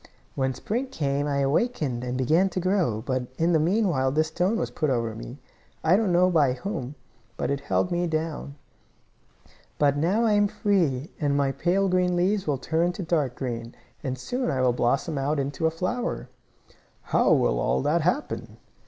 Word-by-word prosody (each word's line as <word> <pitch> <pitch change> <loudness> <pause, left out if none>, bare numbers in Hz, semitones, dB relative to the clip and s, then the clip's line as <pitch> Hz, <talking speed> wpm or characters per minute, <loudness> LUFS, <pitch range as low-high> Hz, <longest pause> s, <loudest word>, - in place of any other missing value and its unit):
When 130 -1 -1
spring 245 +6 -2
came 145 - -1
I 140 -1 0
awakened 140 - 0
and 125 0 -3
began 160 +9 +3
to 185 - -3
grow, 175 - 0
but 130 -2 -1
in 170 +2 +2
the 160 - +4
meanwhile 165 -6 +2
this 155 +2 +1
stone 180 +7 0
was - - -2
put 155 - -1
over 115 -3 0
me. 115 +4 -8 0.5
I 160 +3 +5
don't 205 -2 +2
know 180 +1 +4
by 145 -7 +3
whom. 135 - -5 0.4
But - - -1
it 140 - -1
held 180 +5 0
me 175 0 0
down. 155 -3 -3 1.2
"But 145 -1 +3
now 190 +10 +2
I 220 - +3
am 205 0 +4
free, 170 - 0
and 145 -2 +1
my 140 -1 +2
pale 185 +7 +1
green 180 -1 +2
leaves 190 +2 +1
will 145 -2 +1
turn 165 +6 0
to 190 - -5
dark 155 -7 0
green, 115 -3 -5 0.3
and 130 -2 -3
soon 245 - -2
I 130 - 0
will 125 -1 +3
blossom 135 +5 0
out 145 +3 0
into 140 +3 -1
a - - +3
flower." 180 - -3 0.8
"How - - +4
will - - +3
all - - +1
that 155 +4 +2
happen?" 180 - -2
155 Hz, 185 wpm, -26 LUFS, 135-180 Hz, 1.2 s, I